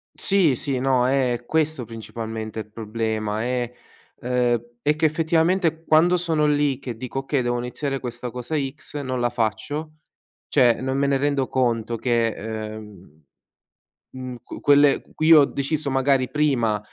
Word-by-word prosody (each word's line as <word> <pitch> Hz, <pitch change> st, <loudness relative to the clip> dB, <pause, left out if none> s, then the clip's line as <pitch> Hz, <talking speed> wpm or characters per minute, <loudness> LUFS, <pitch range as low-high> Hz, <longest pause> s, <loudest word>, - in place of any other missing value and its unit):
Sì, 185 Hz, -9 st, +3 dB
sì, 135 Hz, 0 st, -2 dB
no, 130 Hz, -1 st, +2 dB
è 125 Hz, -3 st, +1 dB
questo 155 Hz, -5 st, 0 dB
principalmente 110 Hz, -1 st, -6 dB
il 105 Hz, 0 st, -8 dB
problema: 110 Hz, -1 st, -2 dB
è 125 Hz, -1 st, -1 dB, 0.5 s
ehm, 125 Hz, -1 st, +1 dB, 0.2 s
è 150 Hz, +1 st, +2 dB
che 155 Hz, -, +1 dB
effettivamente 165 Hz, +1 st, +1 dB
quando 170 Hz, +3 st, +4 dB
sono 160 Hz, -3 st, +1 dB
lì 145 Hz, -2 st, +1 dB
che 125 Hz, -4 st, -6 dB
dico: 130 Hz, +2 st, -4 dB
"Okay, 135 Hz, 0 st, -1 dB
devo 120 Hz, 0 st, 0 dB
iniziare 135 Hz, +3 st, -3 dB
questa 120 Hz, -1 st, -6 dB
cosa 125 Hz, +5 st, -4 dB
X", 145 Hz, +1 st, -5 dB
non 130 Hz, -2 st, -3 dB
la 120 Hz, 0 st, +1 dB
faccio; 125 Hz, +7 st, -3 dB, 0.5 s
cioè, 125 Hz, -5 st, +4 dB
non 130 Hz, +1 st, -1 dB
me 140 Hz, -, +2 dB
ne 140 Hz, -, +2 dB
rendo 140 Hz, -1 st, 0 dB
conto 120 Hz, -3 st, 0 dB
che, 115 Hz, -1 st, +1 dB
ehm, 105 Hz, -7 st, -8 dB, 0.9 s
uhm, 130 Hz, -1 st, -7 dB
qu -, -, -9 dB
quelle 145 Hz, -1 st, +5 dB
cui 160 Hz, +1 st, +5 dB
ho 145 Hz, -3 st, +8 dB
deciso 140 Hz, +2 st, -2 dB
magari 135 Hz, -1 st, +2 dB
prima 125 Hz, -8 st, +1 dB
130 Hz, 150 wpm, -23 LUFS, 115-145 Hz, 0.9 s, ho